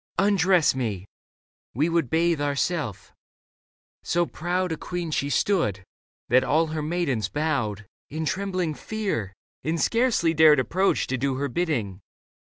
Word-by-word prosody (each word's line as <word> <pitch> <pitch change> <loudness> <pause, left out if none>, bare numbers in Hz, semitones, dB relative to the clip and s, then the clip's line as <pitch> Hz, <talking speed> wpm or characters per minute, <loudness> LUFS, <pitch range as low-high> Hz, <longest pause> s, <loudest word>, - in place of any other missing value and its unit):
Undress 190 -4 +3
me. 110 -8 -3 0.7
We 150 +6 +2
would 165 -6 0
bathe 165 -1 +2
ourself." 145 - -2 0.9
So 175 0 +1
proud 180 +2 -2
A - - 0
queen 175 -1 -4
she 140 -1 -1
stood, 145 - +1 0.4
that 130 +2 +4
all 155 +5 +2
her 155 -1 -4
maidens 150 - -1
bowed 120 -9 -1 0.2
In 160 +2 -3
trembling 185 0 -1
fear 190 - -3 0.3
and 160 +2 -1
scarcely 230 -8 +2
dared 155 -2 +6
approach 185 +9 +1
To 130 -1 -3
do 135 0 0
her 140 +2 -1
bidding. 120 - -2
155 Hz, 135 wpm, -25 LUFS, 130-175 Hz, 0.9 s, dared